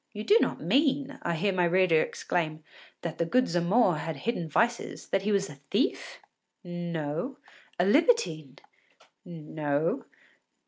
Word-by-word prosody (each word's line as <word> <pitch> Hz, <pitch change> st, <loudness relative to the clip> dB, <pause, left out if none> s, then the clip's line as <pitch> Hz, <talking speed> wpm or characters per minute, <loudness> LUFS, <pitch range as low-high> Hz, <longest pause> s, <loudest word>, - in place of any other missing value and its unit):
“You 210 Hz, -, -5 dB
do 430 Hz, -, +5 dB
not -, -, 0 dB
mean,” 280 Hz, 0 st, +1 dB
I 170 Hz, -, -1 dB
hear 195 Hz, +4 st, 0 dB
my 180 Hz, -1 st, +2 dB
reader 175 Hz, -2 st, +4 dB
exclaim, 155 Hz, -3 st, -2 dB, 0.4 s
“that 170 Hz, -2 st, -5 dB
the -, -, +3 dB
good 255 Hz, +8 st, +3 dB
Zamore 175 Hz, +2 st, +2 dB
had 160 Hz, +1 st, -4 dB
hidden 165 Hz, -, -3 dB
vices? 235 Hz, +9 st, 0 dB
that 195 Hz, -, +1 dB
he 210 Hz, +2 st, -1 dB
was 200 Hz, -1 st, +1 dB
a 140 Hz, -5 st, -12 dB
thief?” 265 Hz, -, -1 dB, 0.4 s
No. 170 Hz, -, -4 dB, 0.4 s
“A 175 Hz, -, +4 dB
libertine?” 205 Hz, -, +2 dB, 0.7 s
No. 155 Hz, -, -2 dB
175 Hz, 140 wpm, -28 LUFS, 160-235 Hz, 0.7 s, do